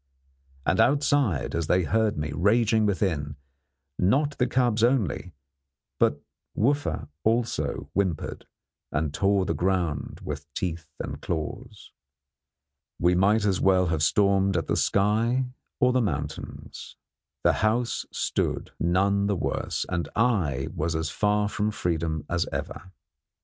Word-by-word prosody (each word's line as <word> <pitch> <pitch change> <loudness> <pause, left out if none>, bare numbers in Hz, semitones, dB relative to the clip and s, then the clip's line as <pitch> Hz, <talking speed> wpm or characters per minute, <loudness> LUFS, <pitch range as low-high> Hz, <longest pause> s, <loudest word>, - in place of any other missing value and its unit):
And - - +2
outside, 140 - +2
as 85 -2 -1
they 90 +2 +3
heard 110 +2 +1
me 75 0 -2
raging 110 +6 +3
within, 80 -8 -1 0.6
not 140 +10 +2
the 125 - +3
cubs 120 -4 +1
only 100 - +1 0.6
but 70 - +3 0.4
Wooffa 140 +6 0 0.2
also 115 +1 0
whimpered 95 -6 -2 0.4
and 75 -1 -1
tore 100 +2 +2
the - - 0
ground 85 -5 -1
with - - -6
teeth 85 -3 -3
and - - -5
claws. 100 +8 -5 1.1
We 90 +1 +3
might 100 +4 +3
as 95 -3 +1
well 95 -1 +4
have 80 - -1
stormed 100 +2 +3
at 80 - -1
the - - 0
sky 110 +6 +2 0.3
or 125 0 +4
the 130 - +3
mountains. 75 - -5 0.5
The - - +5
house 115 +3 +1
stood, - - -2
none 100 +3 +2
the 100 - +1
worse, - - -2
and 85 -2 -2
I 90 - +1
was 80 +2 -1
as 80 0 -2
far 105 +1 +1
from 105 +1 -1
freedom 80 -6 -2
as 85 0 0
ever. 95 - -5
95 Hz, 130 wpm, -26 LUFS, 85-110 Hz, 1.1 s, The